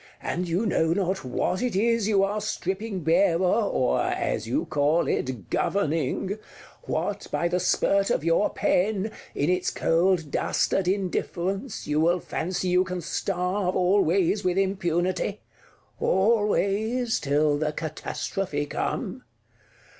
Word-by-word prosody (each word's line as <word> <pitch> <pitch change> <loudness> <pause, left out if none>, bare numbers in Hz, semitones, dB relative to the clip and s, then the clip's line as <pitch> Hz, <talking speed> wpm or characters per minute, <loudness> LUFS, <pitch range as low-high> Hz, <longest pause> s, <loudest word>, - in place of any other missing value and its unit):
And 175 0 -2
you 180 +7 0
know 165 -5 +2
not 190 0 -1
what 130 +8 -1
it 250 -5 -1
is 230 +1 +2
you 200 -3 +3
are 205 +2 -1
stripping 200 -1 -3
barer, 170 +2 +3 0.3
or 125 - +1
as - - -1
you - - 0
call 150 +3 +1
it, 125 -8 -3
governing; 185 +2 0 0.5
what - - -2
by 170 - +1
the 180 +1 0
spurt 195 +2 +2
of - - 0
your 165 +5 +3
pen, 205 +2 0 0.2
in 145 +5 +1
its 180 0 +1
cold 165 -2 +1
dastard 190 -2 0
indifference, 190 +3 -2
you 150 0 0
will 170 +3 +3
fancy 180 +2 -3
you 180 +1 +4
can 180 -1 -4
starve 180 +2 -1
always 190 +1 +2
with 180 0 0
impunity; 185 0 0 0.6
always 215 +3 +1
till 145 +1 +1
the 155 0 0
catastrophe 155 +1 -3
come! - - -3
185 Hz, 130 wpm, -26 LUFS, 165-200 Hz, 0.6 s, you